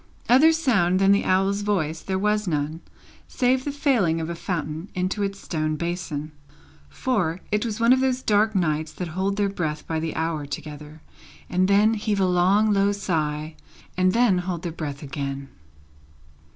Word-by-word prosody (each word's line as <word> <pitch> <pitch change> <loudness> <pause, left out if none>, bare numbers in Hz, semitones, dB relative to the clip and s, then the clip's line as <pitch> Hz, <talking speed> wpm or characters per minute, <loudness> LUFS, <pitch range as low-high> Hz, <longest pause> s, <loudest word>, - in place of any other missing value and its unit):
Other 275 +7 +6
sound 225 - +2
than 195 +1 +4
the 200 - +3
owl's 195 +2 +2
voice 170 -7 -1
there 190 -1 -2
was 210 +1 0
none, 155 0 -2 0.5
save 255 0 +1
the 285 - -2
falling 245 - +1
of 165 +1 -3
a - - -4
fountain 165 -1 -4
into 185 +3 -1
its 195 0 -2
stone 155 -2 -2
basin; 160 -2 -4 0.6
for, 185 - -1
it 210 0 +1
was 225 -2 -3
one 230 +2 +5
of 260 - +2
those 260 -1 0
dark 215 +1 +2
nights 155 -4 0
that 180 -2 -5
hold 190 +4 -1
their 205 -1 +2
breath 155 -6 -3
by 160 -1 -2
the 160 0 -3
hour 160 -3 -2
together, 150 +2 -8 0.5
and 185 +1 +2
then 205 +3 +4
heave 210 -1 -1
a 190 - +3
long 190 +4 +3
low 200 0 +3
sigh, 155 -6 -2 0.4
and 185 +1 +2 0.2
hold 180 -2 -4
their 170 - -3
breath 150 -3 -6
again. 140 -1 -5
185 Hz, 170 wpm, -24 LUFS, 155-205 Hz, 0.6 s, Other